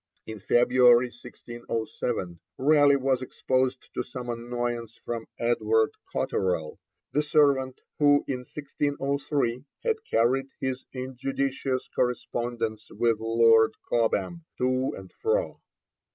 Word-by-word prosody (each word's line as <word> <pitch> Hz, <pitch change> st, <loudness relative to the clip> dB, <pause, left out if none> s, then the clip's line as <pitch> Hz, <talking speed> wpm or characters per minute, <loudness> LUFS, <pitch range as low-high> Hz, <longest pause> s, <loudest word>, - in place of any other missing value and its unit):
In 110 Hz, -1 st, -7 dB
February 125 Hz, +2 st, +5 dB
1607, 120 Hz, -6 st, -5 dB, 0.2 s
Raleigh 145 Hz, 0 st, +5 dB
was 135 Hz, -1 st, +1 dB
exposed 130 Hz, 0 st, -1 dB
to -, -, -1 dB
some 125 Hz, -1 st, -7 dB
annoyance 120 Hz, -1 st, -4 dB
from 115 Hz, -1 st, -4 dB
Edward 110 Hz, -2 st, +2 dB, 0.2 s
Cotterell, 90 Hz, -5 st, -1 dB, 0.3 s
the 150 Hz, -, +2 dB
servant 140 Hz, -4 st, +2 dB, 0.2 s
who 145 Hz, -1 st, +5 dB
in 130 Hz, -2 st, -2 dB
1603 140 Hz, -2 st, -2 dB, 0.2 s
had 450 Hz, -2 st, 0 dB
carried 130 Hz, +4 st, +2 dB
his 130 Hz, -1 st, -3 dB
injudicious 130 Hz, 0 st, -2 dB
correspondence 120 Hz, -3 st, -2 dB
with 115 Hz, -2 st, +1 dB
Lord 115 Hz, 0 st, +4 dB
Cobham 115 Hz, -, 0 dB
to 130 Hz, +1 st, +1 dB
and 95 Hz, -1 st, -12 dB
fro. 485 Hz, +4 st, 0 dB
125 Hz, 105 wpm, -27 LUFS, 115-135 Hz, 0.3 s, February